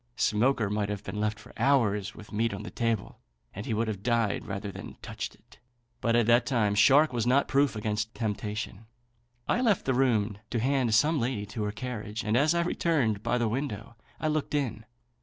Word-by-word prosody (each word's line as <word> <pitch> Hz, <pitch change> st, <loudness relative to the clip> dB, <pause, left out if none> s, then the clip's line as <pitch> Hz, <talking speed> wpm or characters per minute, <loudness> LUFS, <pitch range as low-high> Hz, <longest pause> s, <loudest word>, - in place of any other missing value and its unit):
Smoaker 115 Hz, 0 st, +2 dB
might 105 Hz, -1 st, -1 dB
have 105 Hz, -1 st, -4 dB
been 105 Hz, -, -5 dB
left 105 Hz, 0 st, 0 dB
for -, -, -14 dB
hours 110 Hz, -6 st, +2 dB
with 105 Hz, -, -12 dB
meat 110 Hz, 0 st, 0 dB
on 100 Hz, -, -7 dB
the -, -, -7 dB
table, 115 Hz, -4 st, -2 dB, 0.3 s
and 100 Hz, -, -7 dB
he -, -, -1 dB
would 115 Hz, +1 st, 0 dB
have 105 Hz, -3 st, -3 dB
died 115 Hz, -2 st, 0 dB
rather 100 Hz, 0 st, -4 dB
than -, -, -8 dB
have -, -, -26 dB
touched -, -, -5 dB
it; -, -, -23 dB, 0.4 s
but 115 Hz, -1 st, +1 dB
at 120 Hz, -1 st, +4 dB
that 120 Hz, +1 st, +4 dB
time 110 Hz, -6 st, +2 dB
Shark 135 Hz, +7 st, +5 dB
was 120 Hz, -1 st, 0 dB
not 135 Hz, +3 st, +3 dB
proof 140 Hz, -2 st, +2 dB
against 105 Hz, +1 st, -2 dB
temptation. 105 Hz, -1 st, -4 dB, 0.6 s
I 245 Hz, -, +2 dB
left 220 Hz, -7 st, +2 dB
the 130 Hz, -, +2 dB
room 110 Hz, -6 st, +1 dB
to 120 Hz, -, -1 dB
hand 130 Hz, -2 st, +2 dB
some 150 Hz, +6 st, +3 dB
lady 115 Hz, -4 st, -1 dB
to 105 Hz, +1 st, -4 dB
her 105 Hz, -, -1 dB
carriage, 110 Hz, -1 st, -5 dB
and 110 Hz, +1 st, 0 dB
as 150 Hz, +6 st, +3 dB
I 170 Hz, -, +2 dB
returned 140 Hz, -, +1 dB
by 120 Hz, +2 st, 0 dB
the 120 Hz, -1 st, +1 dB
window, 115 Hz, -2 st, -4 dB, 0.2 s
I 155 Hz, -, -1 dB
looked 150 Hz, -1 st, -1 dB
in. 115 Hz, -6 st, -2 dB
115 Hz, 210 wpm, -28 LUFS, 105-130 Hz, 0.6 s, Shark